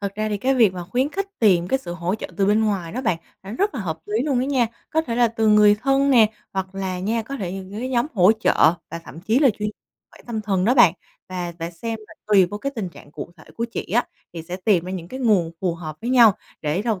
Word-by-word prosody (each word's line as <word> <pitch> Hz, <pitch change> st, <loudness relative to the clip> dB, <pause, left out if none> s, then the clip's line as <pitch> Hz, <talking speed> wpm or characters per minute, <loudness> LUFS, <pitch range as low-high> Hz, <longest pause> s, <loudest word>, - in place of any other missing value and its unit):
thật 200 Hz, -1 st, -4 dB
ra 215 Hz, +1 st, -2 dB
thì 210 Hz, -, -1 dB
cái 260 Hz, +6 st, +1 dB
việc 225 Hz, -7 st, +4 dB
mà 180 Hz, -1 st, -6 dB
khuyến 250 Hz, +10 st, 0 dB
khích 395 Hz, +5 st, -3 dB
tìm 180 Hz, -5 st, +3 dB
cái 265 Hz, -, +2 dB
sự 175 Hz, -10 st, -7 dB
hỗ 175 Hz, +2 st, -2 dB
trợ 220 Hz, -, -5 dB
từ 195 Hz, -, +2 dB
bên 215 Hz, +2 st, +3 dB
ngoài 190 Hz, -6 st, -2 dB
đó 250 Hz, -, -3 dB
bạn 180 Hz, -9 st, 0 dB, 0.2 s
là 195 Hz, -, -9 dB
nó 230 Hz, -, -6 dB
rất 405 Hz, -3 st, 0 dB
là 240 Hz, -, -3 dB
hợp 165 Hz, -5 st, -3 dB
lý 215 Hz, +3 st, 0 dB
luôn 275 Hz, -3 st, 0 dB
đó -, -, 0 dB
nha. 265 Hz, -3 st, +2 dB, 0.2 s
Có 320 Hz, -, +2 dB
thể 240 Hz, -7 st, -4 dB
là 240 Hz, -1 st, +4 dB
từ 225 Hz, -1 st, 0 dB
người 210 Hz, -1 st, +6 dB
thân 275 Hz, +5 st, +1 dB
nè, 225 Hz, -5 st, +5 dB, 0.2 s
hoặc 190 Hz, 0 st, -4 dB
là 190 Hz, -2 st, -3 dB
nha, 220 Hz, +5 st, -1 dB
có 275 Hz, +5 st, -6 dB
thể 185 Hz, -8 st, -4 dB
những 190 Hz, 0 st, -7 dB
cái 255 Hz, -, -3 dB
nhóm 250 Hz, +1 st, +1 dB
hỗ 190 Hz, 0 st, +6 dB
trợ 215 Hz, -6 st, +3 dB, 0.2 s
và 165 Hz, -, -5 dB
thậm 140 Hz, +6 st, -11 dB
chí 220 Hz, +7 st, +2 dB
là 275 Hz, -3 st, +5 dB
chuyên 210 Hz, 0 st, -1 dB, 0.4 s
khỏe -, -, -17 dB
tâm 230 Hz, -3 st, -3 dB
thần 195 Hz, -3 st, 0 dB
đó 245 Hz, +5 st, +3 dB
bạn. 220 Hz, -10 st, +7 dB, 0.4 s
Và 180 Hz, -2 st, -4 dB
và 165 Hz, 0 st, -4 dB
xem 225 Hz, +6 st, -5 dB
là -, -, -14 dB
tùy 200 Hz, -3 st, +5 dB
vô 205 Hz, +4 st, -6 dB
cái 275 Hz, +6 st, -3 dB
tình 210 Hz, -6 st, -3 dB
trạng 165 Hz, -, -15 dB
cụ -, -, -7 dB
thể 155 Hz, -, -16 dB
của 230 Hz, -, -1 dB
chị 235 Hz, -, -4 dB
á, 240 Hz, -, +3 dB, 0.3 s
thì 165 Hz, -1 st, -6 dB
sẽ 175 Hz, +3 st, -6 dB
tìm 190 Hz, -3 st, +2 dB
ra 180 Hz, -, -6 dB
những 175 Hz, -3 st, -6 dB
cái 260 Hz, -, -7 dB
nguồn 205 Hz, -9 st, +2 dB
phù 180 Hz, -3 st, 0 dB
hợp 155 Hz, -3 st, -7 dB
với 235 Hz, +3 st, -3 dB
nhau, 240 Hz, -4 st, +7 dB, 0.3 s
để 155 Hz, +6 st, -1 dB
đầu 220 Hz, -4 st, -1 dB
210 Hz, 285 wpm, -22 LUFS, 180-240 Hz, 0.4 s, bạn